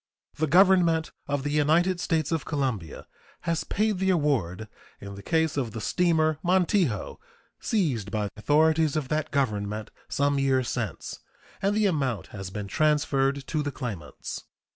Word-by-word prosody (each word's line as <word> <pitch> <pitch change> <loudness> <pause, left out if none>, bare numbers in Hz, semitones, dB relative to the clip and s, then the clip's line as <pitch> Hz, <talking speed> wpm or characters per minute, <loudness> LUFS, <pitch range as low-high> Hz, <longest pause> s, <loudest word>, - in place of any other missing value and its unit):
The 155 +1 +1
Government 175 -1 +4 0.2
of 145 -1 -1
the 145 - -2
United 160 +5 +2
States 160 -3 0
of 165 -2 0
Colombia 125 - -3 0.4
has 165 -1 -1
paid 210 -2 0
the 190 0 +1
award 130 - 0 0.3
in 100 0 -8
the 100 - -9
case 160 +5 0
of 120 -6 -2
the 110 - -4
steamer 155 - +1
Montijo, 175 - +1 0.4
seized 140 - 0
by 105 0 -2
authorities 155 +7 +3
of 145 -4 -2
that 155 0 -1
Government 105 -6 -1 0.2
some 140 0 +1
years 130 -2 +1
since, 110 -8 -4 0.4
and 200 +1 +1
the 215 0 +2
amount 140 - -1
has 95 -2 -6
been 105 +1 -5
transferred 140 -1 +1
to 155 - -1
the 145 -1 -2
claimants. 100 - -6
145 Hz, 150 wpm, -26 LUFS, 115-165 Hz, 0.4 s, Government